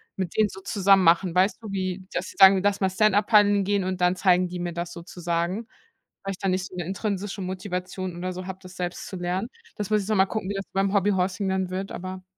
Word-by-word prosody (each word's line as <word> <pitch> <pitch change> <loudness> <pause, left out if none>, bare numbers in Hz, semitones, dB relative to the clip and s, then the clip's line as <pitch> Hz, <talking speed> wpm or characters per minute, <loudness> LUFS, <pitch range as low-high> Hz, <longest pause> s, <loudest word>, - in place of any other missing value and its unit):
mit 185 -3 -4
denen 215 -1 +4
so 190 - -10
zusammen 195 -1 +3
machen. 170 +1 +4
Weißt 185 +3 +2
du, 215 -3 -7
wie, 185 -1 -3
dass 175 - -2
sie - - -11
sagen: 190 0 +8
„Lass 205 0 +1
mal 190 - +3
Stand-up 205 +1 +3
Paddeln 205 -2 +5
gehen,“ 200 0 +1
und 185 0 -3
dann 180 +1 +3
zeigen 180 -1 +3
die 180 0 -6
mir 175 0 -3
das 170 0 -5
sozusagen. 175 +4 -3 0.6
Weil 195 - -3
ich - - -9
da 195 - -2
nicht 185 0 0
so - - -13
'ne 175 -3 -4
intrinsische 200 +1 -3
Motivation 185 0 -4
oder 185 +1 -3
so 185 0 -7
habe, 190 0 -6
das 185 0 -12
selbst 175 -1 -4
zu - - -7
lernen. 180 +4 -2 0.3
Das 205 -2 -4
muss 210 -2 +2
ich - - -9
noch 215 - +2
mal 190 -1 +5
gucken, 215 -2 -4
wie - - -1
das 195 0 -4
beim 195 0 +1
Hobby 200 0 +3
Horsing 190 +1 0
dann 190 -1 -1
wird, 190 +1 -4
aber 185 0 -6
190 Hz, 250 wpm, -25 LUFS, 180-195 Hz, 0.6 s, sagen